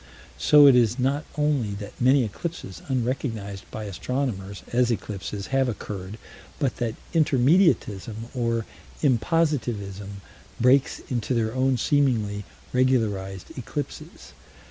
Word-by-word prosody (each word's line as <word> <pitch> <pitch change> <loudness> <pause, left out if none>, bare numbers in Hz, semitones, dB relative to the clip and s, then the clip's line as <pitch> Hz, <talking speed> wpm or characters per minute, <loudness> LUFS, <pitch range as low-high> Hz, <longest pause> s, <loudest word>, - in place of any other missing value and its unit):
So 150 -1 +7
it 135 -3 +8
is 120 -1 +3
not 140 +3 0
only 140 -9 +1
that 100 0 -7
many 130 +2 +5
eclipses 105 - -6
unrecognized 115 -6 -3
by 110 - -6
astronomers 100 -1 -3
as 125 0 +3
eclipses 105 -3 -4
have 135 -1 +3
occurred, 100 -2 -6 0.4
but 135 -5 -1
that 115 -2 -2 0.2
intermediatism, 145 - +3 0.2
or 115 -3 0 0.4
impositivism, 120 - 0 0.5
breaks 130 +3 +3
into 125 0 -1
their 110 -1 0
own 130 0 +2
seemingly 110 -7 +1 0.3
regularized 105 -8 0
eclipses. 130 +4 -7
120 Hz, 110 wpm, -25 LUFS, 105-135 Hz, 0.5 s, it